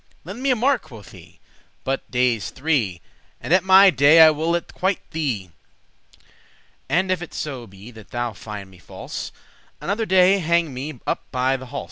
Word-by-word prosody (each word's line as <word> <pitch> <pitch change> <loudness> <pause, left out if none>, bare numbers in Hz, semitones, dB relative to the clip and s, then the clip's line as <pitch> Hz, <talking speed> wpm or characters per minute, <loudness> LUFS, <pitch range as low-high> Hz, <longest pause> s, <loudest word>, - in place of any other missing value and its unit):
"Lend 245 - -8
me 275 - 0
a 255 - +4
mark," 250 0 +1
quoth 115 -10 -14
he, - - -16 0.4
"but 135 0 -3
dayes 125 -5 0
three, 130 - -1 0.4
And 165 - -2
at 185 - +4
my 190 +1 +7
day 145 +2 +5
I 160 -1 +9
will 160 +3 -1
it 170 - -5
quite 190 0 0
thee. 125 - -3 1.4
And 185 +2 +1
if 185 -2 -1
it 175 - -9
so 130 -6 -5
be 100 +5 -13
that 110 -3 -15
thou 120 -1 -3
find 100 -2 -9
me 95 - -17
false, - - -8 0.5
Another 215 +3 -2
day 190 +1 +4
hang 170 -3 +1
me 135 +1 -6
up - - -2
by 130 +1 0
the 130 -1 -8
halse." 140 +2 -5
150 Hz, 180 wpm, -22 LUFS, 120-180 Hz, 1.4 s, I